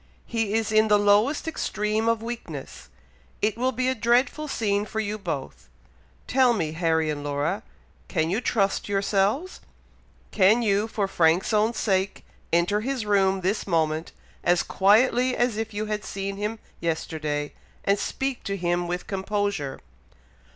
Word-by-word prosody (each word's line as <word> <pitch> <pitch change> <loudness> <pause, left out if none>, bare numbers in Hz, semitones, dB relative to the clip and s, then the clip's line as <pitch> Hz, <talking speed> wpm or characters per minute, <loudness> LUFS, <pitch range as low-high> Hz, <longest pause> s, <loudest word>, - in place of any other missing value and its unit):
He 225 -3 -1
is 225 -1 0
in 215 0 +4
the 210 -1 +5
lowest 205 +10 +3
extreme 215 -7 -1
of 230 -1 0
weakness! 235 0 -7 0.5
It 215 +1 +1
will 255 +3 0
be 255 +1 -1
a 260 - +2
dreadful 250 +6 +1
scene 205 -6 0
for 220 +1 -4
you 215 0 -2
both. 135 - -5 0.6
Tell 255 -1 +4
me, 165 -8 -1
Harry 160 -1 +1
and 145 -1 -5
Laura, 145 +8 -1 0.5
can 160 -2 0
you 210 +6 0
trust 200 -4 0
yourselves? 200 - 0 0.7
Can 215 +4 +4
you, 205 0 +2
for 210 -3 -1
Frank's 170 +2 +2
own 215 +2 +2
sake, 190 -3 0 0.3
enter 175 +5 +2
his 255 -1 -2
room 195 -2 +2
this 195 +4 -1
moment, 160 -2 0 0.3
as 175 0 +3
quietly 245 +5 +3
as 240 -2 +1
if 220 0 -3
you 210 0 -3
had 210 -1 -3
seen 195 0 -4
him 210 +2 -3 0.2
yesterday, 155 -3 -2 0.3
and 200 0 +2
speak 270 +4 -3
to 200 -1 -2
him 175 -1 0
with 180 +1 -3
composure?" 195 -6 -2
205 Hz, 150 wpm, -25 LUFS, 175-225 Hz, 0.7 s, the